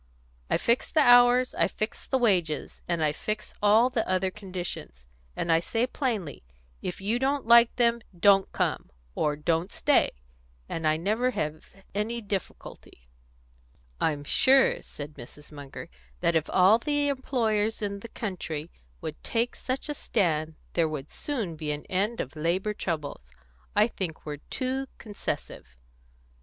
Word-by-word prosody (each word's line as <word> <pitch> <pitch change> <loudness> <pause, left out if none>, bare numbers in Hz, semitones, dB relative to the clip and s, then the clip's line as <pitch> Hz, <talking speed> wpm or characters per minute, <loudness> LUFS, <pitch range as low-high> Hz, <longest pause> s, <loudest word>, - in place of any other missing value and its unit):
I - - +3
fix 235 +1 +1
the 310 - +4
hours, 245 0 +6
and - - +3
I - - +1
fix 215 +1 -4
the 265 - +2
wages, 180 - 0
and 170 -2 0
I 150 - +3
fix 215 +7 -4
all 220 +5 +5
the 235 -3 0
other 185 0 +1
conditions, 180 - -6 0.3
and 170 - -1
I 165 - +5
say 225 +7 0
plainly, 230 - -3 0.4
'If 180 - -5
you 220 +5 +1
don't 275 +1 0
like 235 0 +7
them, 235 -1 +3 0.2
'don't 195 0 +5
come,' - - -1 0.2
or 150 - 0
'don't 165 +4 0
stay,' - - +3 0.5
and 160 -1 -2
I 155 0 +3
never 215 +9 +1
have 155 -9 -3 0.3
any 215 +4 -1
difficulty." 195 - -7 0.9
"I'm 145 -2 0
sure," 265 - +4
said 145 +1 -8
Mrs. 150 +4 -12
Munger, 145 -2 -9 0.3
"that 170 - +2
if 160 -1 +1
all 190 +5 +5
the 290 +2 0
employers 225 -6 0
in 200 -1 -2
the 230 - -9
country 170 -7 -5 0.3
would - - -6
take 235 +2 -1
such 260 +3 -3
a 295 - -2
stand, 160 - 0 0.2
there 165 -2 +2
would 150 -2 -6
soon 225 - -3
be 155 -1 -5
an 150 0 -5
end 205 +5 0
of 135 - -4
labour 175 +7 0
troubles. 150 - -4 0.4
I 210 +2 +5
think 180 -8 -5
we're 150 -1 -4
too 265 +1 -2
concessive." 200 - -6
200 Hz, 155 wpm, -27 LUFS, 160-235 Hz, 0.9 s, like